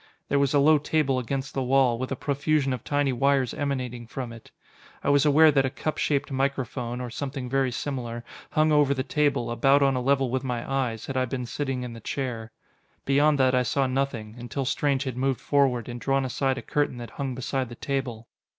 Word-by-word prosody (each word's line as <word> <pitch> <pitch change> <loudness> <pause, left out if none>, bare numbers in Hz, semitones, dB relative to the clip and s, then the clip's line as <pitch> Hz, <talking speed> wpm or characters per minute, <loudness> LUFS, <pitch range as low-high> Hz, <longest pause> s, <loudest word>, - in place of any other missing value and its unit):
There 140 - +2
was 140 0 +2
a - - +5
low 150 +2 +5
table 145 -3 +1
against 135 +2 -3
the 135 - -1
wall, 130 -2 +3
with 130 +1 -4
a - - 0
profusion 140 0 0
of 125 - -5
tiny 145 -2 +1
wires 135 0 +2
emanating 125 -4 -3
from 120 0 -5
it. 115 - -13 0.5
I - - +1
was 145 +1 +4
aware 155 +2 +7
that 135 -2 +3
a 130 - 0
cup 155 +3 -4
shaped 140 -1 0
microphone 130 -3 -2
or 125 -1 -5
something 135 0 -4
very 135 0 +1
similar 120 -3 -4 0.3
hung 155 0 +2
over 145 -2 +4
the 130 - -1
table, 145 -5 0
about 135 +4 +4
on 135 -1 +3
a 125 - 0
level 135 -1 +2
with 130 +1 -1
my 125 -3 -3
eyes, 125 -5 -1
had 135 - -4
I 130 - +2
been 125 0 -4
sitting 135 0 -3
in 125 -1 -6
the 115 - -9
chair. 115 -2 -4 0.5
Beyond 145 +2 +4
that 130 -1 +3
I 125 - +4
saw 135 +3 +1
nothing, 130 -5 -2
until 125 +3 -4
Strange 140 +1 +1
had 130 -3 -4
moved 135 0 0
forward 135 -5 +1
and 120 -1 -6
drawn 135 0 +1
aside 130 +1 0
a - - -6
curtain 145 -4 -1
that 120 -1 -8
hung 135 -3 -4
beside 130 0 -2
the 120 - -8
table. 125 -4 -3
135 Hz, 215 wpm, -26 LUFS, 125-140 Hz, 0.5 s, aware